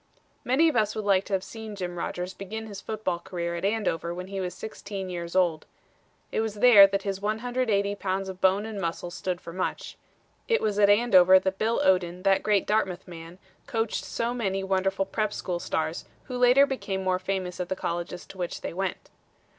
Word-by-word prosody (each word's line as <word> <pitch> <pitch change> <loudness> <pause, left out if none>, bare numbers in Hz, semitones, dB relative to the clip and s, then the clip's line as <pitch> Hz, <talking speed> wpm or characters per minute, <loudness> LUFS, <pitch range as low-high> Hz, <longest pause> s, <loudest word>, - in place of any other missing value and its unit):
Many 270 +7 +3
of 310 - +1
us 215 -2 +1
would 215 - -3
like 195 -1 +3
to 205 - -6
have 190 -1 +1
seen 220 +1 -8
Jim 180 -3 -4
Rodgers 180 +1 -4
begin 220 +3 -6
his 200 -2 -8
football 210 -5 -3
career 170 -1 -4
at 170 - -5
Andover 195 -5 -1
when 180 +1 -7
he 195 -1 -3
was 180 -1 -4
sixteen 200 -3 -6
years 170 0 -5
old. 175 -4 +2 0.6
It - - -1
was 220 -2 -3
there 210 -3 +8
that 195 0 -2
his 195 -1 -3
180 215 -1 0
pounds 190 0 -2
of 185 -1 -8
bone 190 +2 +3
and 215 -3 -5
muscle 170 0 -3
stood 180 0 -3
for 170 - -9
much. 185 +1 -4 0.5
It 460 -1 +3
was 210 -1 -1
at 205 -1 +6
Andover 190 -4 +6
that 190 0 -1
Bill 225 +2 +1
Odlin, 180 -1 +2
that 195 -1 +3
great 205 -3 +2
Dartmouth 195 -4 0
man, 165 0 -10 0.3
coached 225 -3 -1
so 230 +5 -2
many 195 -5 -1
wonderful 195 0 0
prep. 215 +2 -1
school 175 -2 -3
stars, 160 -1 -2 0.2
who 255 - -7
later 250 +3 +6
became 200 -8 -3
more 185 -1 +1
famous 185 -1 -3
at 180 - -3
the 190 - -1
colleges 175 0 -4
to 190 - -13
which 175 -1 -4
they - - -5
went. 190 +1 -4
195 Hz, 200 wpm, -27 LUFS, 180-215 Hz, 0.6 s, there